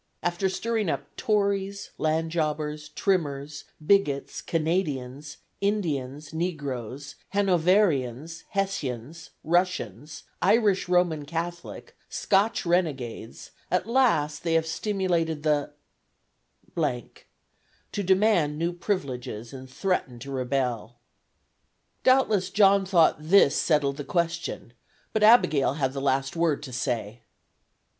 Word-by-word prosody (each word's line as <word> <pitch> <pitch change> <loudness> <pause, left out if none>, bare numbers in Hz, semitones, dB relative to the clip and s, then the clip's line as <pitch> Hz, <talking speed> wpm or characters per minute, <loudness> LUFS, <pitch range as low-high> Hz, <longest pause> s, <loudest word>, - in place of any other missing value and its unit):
After 175 +2 0
stirring 220 0 -1
up - - -4
Tories, 200 -2 -1
land 160 +1 0
jobbers, 150 -2 -2
trimmers, 145 -6 -2 0.2
bigots, 150 -8 +1
Canadians, 150 -4 -2 0.2
Indians, 150 -8 -2
negroes, 145 -5 -4 0.2
Hanoverians, 165 - +2
Hessians, 160 - -3
Russians, 155 - -1 0.2
Irish 200 -2 +3
Roman 175 -4 +2
Catholic, 170 +3 -6
Scotch 200 +1 +1
renegades, 140 -10 -2 0.2
at 180 - +1
last 215 - +2
they 165 -1 +1
have 165 0 +2
stimulated 165 -4 -1
the 150 -1 +1 1.0
to 150 - -6
demand 190 -6 +3
new 170 +2 -1
privileges 130 - -4
and 130 -1 -9
threaten 145 -5 -2
to 140 +3 -8
rebel." 125 -3 -2 1.1
Doubtless 220 -8 +3
John 195 -1 +4
thought 175 -4 +4
this 155 -1 +4
settled 145 -3 +1
the 145 - -4
question; 170 -7 -2 0.4
but 220 - 0
Abigail 210 - +5
had 135 -3 -1
the 135 - -4
last 135 +1 0
word 165 -4 +1
to 130 -3 -8
say. 120 -2 -3
160 Hz, 105 wpm, -26 LUFS, 140-190 Hz, 1.1 s, Abigail